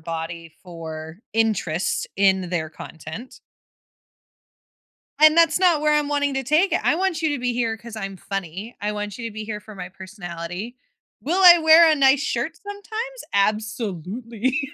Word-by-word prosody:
body 165 0 -6
for 160 -1 -8
interest 195 -6 0
in 190 -2 +2
their 165 -3 -2
content. 160 - -10 1.8
And 310 +1 +7
that's 335 -1 +4
not 350 -5 +3
where 300 0 +3
I'm 295 -1 0
wanting 285 -1 0
to 270 - -1
take 310 +8 +2
it. 345 - +2
I - - +3
want 365 -2 -1
you 320 - +1
to 290 -3 -2
be 250 0 -1
here 230 -2 -1
'cause 230 +1 -11
I'm 195 -3 -6
funny, 195 +4 -6
I 210 +1 -1
want 210 -1 -5
you 230 -2 -5
to 225 - -9
be 215 0 -6
here 210 -1 -5
for 215 +1 -13
my 185 -2 -8
personality. 185 +3 -8 0.4
Will 350 +6 0
I 350 -1 +10
wear 320 0 +7
a 310 - +4
nice 270 -1 +4
shirt 315 +2 -2
sometimes? 435 +5 -7
Absolutely. 215 - -1
225 Hz, 165 wpm, -22 LUFS, 185-300 Hz, 1.8 s, I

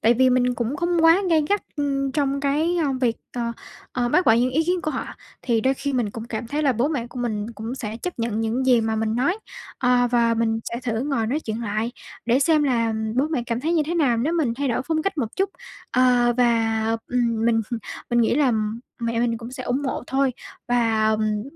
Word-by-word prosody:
Tại 235 +2 +4
vì 260 +1 +4
mình 250 0 +2
cũng 240 +4 -2
không 345 0 +1
quá 330 +4 +7
gay 315 -2 +4
gắt, 410 0 +1
ưm, 275 -2 -1
trong 280 -1 0
cái, 300 +5 +1
ơ, 300 -5 +1
việc, 235 -3 +1 0.2
ờ, 235 -1 -2 0.4
ờ, 245 -1 0
bác 360 +8 +2
bỏ 225 - +7
những 240 +3 +3
ý 315 +5 +1
kiến 360 +1 0
của 310 - -1
họ. - - -3 0.4
Thì 230 -3 +1
đôi 265 +3 +2
khi 280 +1 -3
mình 240 -5 0
cũng 225 +1 -7
cảm 230 0 -5
thấy 295 +5 -2
là 275 -3 +3
bố 245 +5 +1
mẹ 260 -7 -2
của 250 - -9
mình 215 -3 -2
cũng 225 +4 -5
sẽ 220 -4 -5
chấp 360 +2 -6
nhận 230 -1 -1
những 235 +4 -1
gì 245 -3 +5
mà 220 0 -1
mình 220 0 0
nói. 345 - +1 0.4
Ờ, 250 -1 +3
và 235 -1 +3
mình 225 0 +1
sẽ 235 +2 -4
thử 230 -3 -1
ngồi 260 -5 -1
nói 285 +7 -1
chuyện 225 -1 -4
lại 220 +2 -2 0.3
để 240 +2 +4
xem 310 0 +4
là 230 -5 +1 0.2
bố 275 - +3
mẹ 285 -7 -1
cảm 235 +1 -2
thấy 325 +4 0
như 325 - +3
thế 340 - -2
nào 275 -9 +2
nếu 275 +8 0
mình 290 -9 +1
thay 280 +1 -1
đổi 235 - 0
phong 315 -1 +1
cách 390 -5 -2
một 230 -4 -3
chút. 390 0 +1 0.4
Ờ, 245 -1 +4
và, 225 -2 +2 0.3
ừm, 235 -3 0
mình 230 -1 +3 0.5
mình 240 0 +3
nghĩ 230 - +2
là 275 -4 +3 0.5
mẹ 230 0 -1
mình 235 -1 +1
cũng 235 +1 -8
sẽ 255 - -6
ủng 255 +4 -1
hộ 265 - -2
thôi 270 -1 +1 0.4
và, 225 -3 +2
ừm, 215 -1 -1
245 Hz, 240 wpm, -23 LUFS, 230-280 Hz, 0.5 s, quá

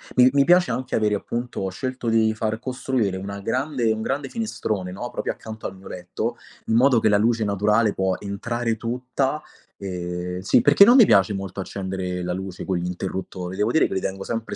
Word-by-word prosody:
mi 125 +1 +7
mi 140 -1 +5
piace 175 -5 +5
anche 130 +3 -2
avere, 105 -1 +2
appunto 120 +3 -4
ho 95 - -1
scelto 130 +5 -5
di 110 -1 +3
far 110 0 -2
costruire 125 -6 -1
una 100 +1 -6
grande 130 0 0
un 110 - -4
grande 135 +3 -2
finestrone, 105 - -3
no, 120 +6 -5
proprio - - -2
accanto 110 0 -7
al 95 - -9
mio 95 - -13
letto, 100 +7 -4 0.3
in 110 - +1
modo 125 -1 +5
che - - +2
la 105 - +4
luce 115 +1 +2
naturale 105 +2 +2
può 95 -1 0
entrare 115 +3 -2
tutta, 130 +5 -2 0.4
ehm, 90 -1 -4
sì, 95 - +3
perché 145 +8 +7
non 245 - +7
mi 235 -6 +9
piace 100 - +4
molto 95 0 -5
accendere 95 -2 -4
la 90 - -2
luce 95 0 -6
con 95 -2 0
gli 85 - -3
interruttori, 95 0 -5
devo 105 +3 +1
dire 160 - +4
che - - -5
li 95 - 0
tengo 95 +1 -4
sempre 115 -1 -4
110 Hz, 205 wpm, -23 LUFS, 95-125 Hz, 0.4 s, mi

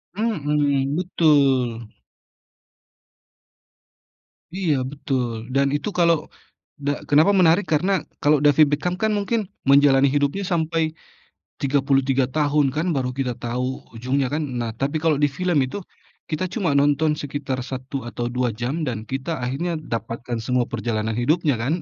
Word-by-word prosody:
Mhm, 145 -9 0
betul. 135 - +2 2.6
Iya, 175 -4 0 0.2
betul. 125 -5 -3
Dan 140 +1 +3
itu 145 +6 -2
kalau, 170 -3 +2 0.5
da 145 0 -2
kenapa 155 +7 +5
menarik, 185 0 +4
karena 180 +6 +2 0.3
kalau 150 +1 +4
David 145 +1 +6
Beckham 180 +4 -2
kan 220 0 +2
mungkin, 205 0 -1 0.2
menjalani 140 0 +5
hidupnya 145 +7 0
sampai 160 -1 0 0.7
33 135 -1 +2
tahun 145 -1 +2
kan, 155 +3 0
baru 125 -1 -1
kita 125 -1 -2
tahu 125 +2 -3
ujungnya 130 +3 0
kan. 155 - 0 0.2
Nah, 115 -1 -2
tapi 140 +4 -2
kalau 160 -3 +3
di 145 - +4
film 175 +3 -1
itu, 130 - -6 0.5
kita 165 +3 -1
cuma 185 -9 0
nonton 145 +2 +3
sekitar 140 -2 -4
1 130 0 -5
atau 120 0 -4
2 125 0 0
jam, 135 +8 -2
dan 120 -3 -2
kita 135 +6 -4
akhirnya 150 +8 -2
dapatkan 120 -4 -4
semua 125 -1 +2
perjalanan 110 -1 -2
hidupnya 150 +3 +2
kan. 140 +7 0
145 Hz, 135 wpm, -22 LUFS, 130-160 Hz, 2.6 s, David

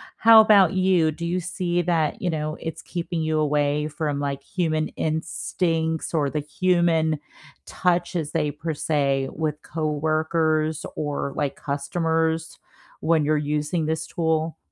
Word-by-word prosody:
How 225 0 +8
about 200 -5 +5
you? 185 -4 +3
Do 170 +3 -8
you 175 +2 0
see 175 0 -1
that, 165 -3 0
you 180 - -1
know, 155 0 -3
it's 165 -1 -6
keeping 170 -1 -4
you 155 0 0
away 150 0 +1
from, 150 -2 -2
like, 140 -1 -2
human 155 0 -1
instincts 160 0 -1
or 150 -3 +2
the 150 - -2
human 160 0 +1 0.5
touch, 175 0 0
as 155 -4 -2
they 150 -3 0
per 155 +2 -4
se, 140 -3 0
with 150 -2 -3
coworkers 155 0 0
or, 145 -2 -3
like, 145 -2 -1
customers 160 +2 -1 0.4
when 160 -2 +2
you're 155 +1 +2
using 150 +2 -1
this 160 0 -2
tool? 160 -1 -1
160 Hz, 145 wpm, -24 LUFS, 150-170 Hz, 0.5 s, How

